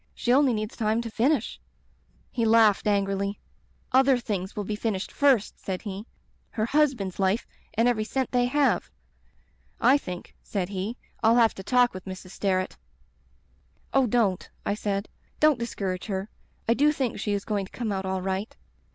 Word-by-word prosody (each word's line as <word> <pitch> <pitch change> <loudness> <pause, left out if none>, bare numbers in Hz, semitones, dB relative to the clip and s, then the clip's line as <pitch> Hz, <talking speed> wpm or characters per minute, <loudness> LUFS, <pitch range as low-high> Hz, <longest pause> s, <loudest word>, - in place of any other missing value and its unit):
She 240 - +1
only 275 0 +5
needs 215 +1 -4
time 220 0 +1
to 230 -1 -6
finish 250 +2 +1 0.4
' - - -39 0.3
"He 235 - -1
laughed 220 -2 +5
angrily. 200 0 0 0.5
'Other 265 0 +5
things 200 -5 -4
will 210 - -2
be 210 +2 -3
finished 210 -3 -2
first,' 270 -7 +2
said 185 -2 -4
he. 205 +1 -6 0.4
'Her 215 -2 -1
husband's 250 -10 +1
life 195 +4 +1 0.3
and 230 +2 +3
every 230 -3 +2
cent 260 +3 -2
they 245 -1 +3
have. 290 +2 +2 0.9
I 260 +4 +5
think,' 180 -8 -7
said 190 -3 -3
he, 200 +4 -3 0.2
'I'll 225 +1 +5
have 230 -2 +5
to - - -8
talk 245 +4 +3
with 185 0 -8
Mrs. 185 -1 -8
Sterret.' 185 -2 -1 1.2
"'Oh, 270 -2 +4
don't,' 210 -5 +1 0.2
I - - +1
said. 205 -1 -2 0.3
'Don't 305 -4 +4
discourage 195 -6 -3
her. 195 0 -3 0.4
I 230 - +5
do 295 +5 +4
think 265 -6 -2
she 205 - -1
is 200 -1 -2
goiiig 205 -3 -1
to - - -16
come 235 -4 -2
out 190 -1 -2
all 190 -1 -2
right.' 190 +3 -3
215 Hz, 175 wpm, -26 LUFS, 195-245 Hz, 1.2 s, only